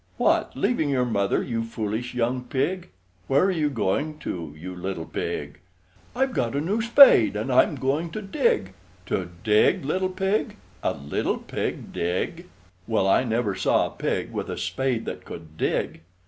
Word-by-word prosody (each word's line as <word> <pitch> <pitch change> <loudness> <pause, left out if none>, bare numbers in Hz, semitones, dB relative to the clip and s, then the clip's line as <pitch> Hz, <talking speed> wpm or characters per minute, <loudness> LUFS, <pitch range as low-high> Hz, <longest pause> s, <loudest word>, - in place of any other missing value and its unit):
What, - - +1
leaving 160 -12 +1
your 130 -3 +2
Mother, 100 -4 +1
you 115 -3 -2
foolish 115 +2 -4
young 125 +1 0
pig? 170 +8 -2 0.4
Where 135 +4 +4
are 195 - +3
you 155 -5 +1
going 140 +5 -1
to, 80 -4 -5
you 90 +3 -7
little 90 -2 -4
pig? 75 -1 -4 0.6
"I've 265 +1 +1
got 120 - -1
a - - +1
new 195 +9 0
spade, 235 - +7
and 110 +5 -1
I'm - - +4
going 145 +6 -1
to 215 - -4
dig!" 195 - 0 0.3
To 90 -1 -2
dig, 105 +5 +3
little 185 +5 0
pig! 190 +3 -1 0.2
A - - 0
little 70 +1 -2
pig - - -4
dig! 95 - -2 0.4
Well, 110 -4 +1
I 95 - +4
never 115 -3 0
saw - - +2
a - - -5
pig - - -2
with - - -4
a - - -4
spade 115 +6 -1
that - - -6
could 80 -1 -10
dig! 80 - -1
125 Hz, 170 wpm, -25 LUFS, 100-160 Hz, 0.6 s, spade